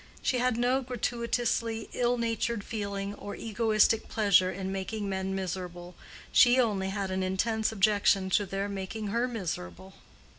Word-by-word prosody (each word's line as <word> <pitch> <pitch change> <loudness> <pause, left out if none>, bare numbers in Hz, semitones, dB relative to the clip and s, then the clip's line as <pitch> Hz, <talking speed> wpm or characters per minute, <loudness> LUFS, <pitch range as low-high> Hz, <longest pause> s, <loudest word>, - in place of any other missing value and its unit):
She 255 - +1
had 250 -1 +1
no 250 +3 +2
gratuitously 235 -2 -1
ill 245 0 +1
natured 230 -2 -1
feeling, 200 -2 -4
or 205 0 -7
egoistic 220 0 +2
pleasure 200 -4 +4
in 190 0 -4
making 200 +2 -3
men 190 0 -2
miserable. 180 -1 -5 0.4
She 245 +1 +6
only 200 -6 +1
had 195 -1 -3
an 190 0 -1
intense 220 +4 0
objection 200 -2 +2
to 205 +1 +2
their 195 +2 -2
making 200 +2 -4
her 235 +4 +1
miserable. 95 - -5
205 Hz, 145 wpm, -29 LUFS, 190-230 Hz, 0.4 s, She